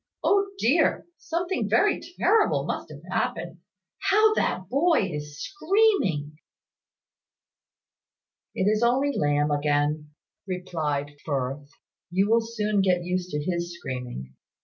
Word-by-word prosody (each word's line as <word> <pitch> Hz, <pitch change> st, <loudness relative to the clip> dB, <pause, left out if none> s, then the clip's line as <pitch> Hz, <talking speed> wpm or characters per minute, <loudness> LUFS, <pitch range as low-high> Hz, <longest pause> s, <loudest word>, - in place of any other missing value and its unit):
"O 400 Hz, 0 st, +3 dB
dear! 315 Hz, +2 st, +2 dB
Something 340 Hz, -, -2 dB
very 390 Hz, -, +3 dB, 0.2 s
terrible 420 Hz, +3 st, +3 dB
must -, -, -4 dB
have -, -, -11 dB
happened. -, -, -2 dB, 0.5 s
How 430 Hz, +2 st, +5 dB
that 185 Hz, -, -1 dB
boy 280 Hz, -, +2 dB
is 150 Hz, 0 st, -6 dB
screaming!" 320 Hz, -, +1 dB, 2.2 s
"It -, -, 0 dB
is 210 Hz, +2 st, +2 dB
only 265 Hz, +4 st, +2 dB
Lamb 145 Hz, 0 st, +1 dB
again," 145 Hz, +1 st, 0 dB, 0.4 s
replied 155 Hz, -6 st, -3 dB
Firth. 140 Hz, 0 st, -3 dB, 0.4 s
"You 190 Hz, +3 st, +2 dB
will 230 Hz, 0 st, +5 dB
soon 215 Hz, -3 st, 0 dB
get 180 Hz, -2 st, +2 dB
used 180 Hz, 0 st, -2 dB
to 150 Hz, -3 st, -3 dB
his 170 Hz, 0 st, -3 dB
screaming. 125 Hz, -, -6 dB
180 Hz, 115 wpm, -26 LUFS, -, 2.2 s, How